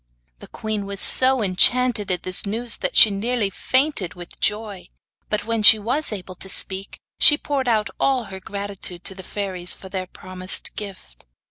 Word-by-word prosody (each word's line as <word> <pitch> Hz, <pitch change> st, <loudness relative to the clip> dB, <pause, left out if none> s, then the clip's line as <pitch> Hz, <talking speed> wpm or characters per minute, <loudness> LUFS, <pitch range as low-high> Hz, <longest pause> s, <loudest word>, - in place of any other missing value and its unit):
The -, -, -12 dB
queen 215 Hz, -2 st, -4 dB
was 200 Hz, -1 st, -4 dB
so 260 Hz, 0 st, +3 dB
enchanted 210 Hz, +3 st, +2 dB
at 180 Hz, -, 0 dB
this 185 Hz, 0 st, 0 dB
news 230 Hz, +4 st, -2 dB
that -, -, -3 dB
she 215 Hz, -, +9 dB
nearly 210 Hz, +1 st, -1 dB
fainted 255 Hz, -, 0 dB
with 175 Hz, -1 st, -11 dB
joy; 210 Hz, -4 st, -2 dB, 0.4 s
but 210 Hz, -1 st, -2 dB
when 230 Hz, -1 st, -1 dB
she 215 Hz, +1 st, +8 dB
was 250 Hz, +8 st, -2 dB
able 190 Hz, -3 st, -6 dB
to 190 Hz, +2 st, -2 dB
speak, 190 Hz, 0 st, -1 dB, 0.2 s
she 295 Hz, -2 st, +7 dB
poured 280 Hz, -4 st, -3 dB
out 215 Hz, -3 st, +1 dB
all 265 Hz, -3 st, +1 dB
her 195 Hz, -3 st, -9 dB
gratitude 200 Hz, -2 st, -5 dB
to -, -, +1 dB
the 190 Hz, -, -10 dB
fairies 185 Hz, -2 st, -2 dB
for 190 Hz, -, -12 dB
their 185 Hz, -1 st, -4 dB
promised 185 Hz, 0 st, -4 dB
gift. 190 Hz, -, -9 dB
200 Hz, 175 wpm, -22 LUFS, 185-230 Hz, 0.4 s, she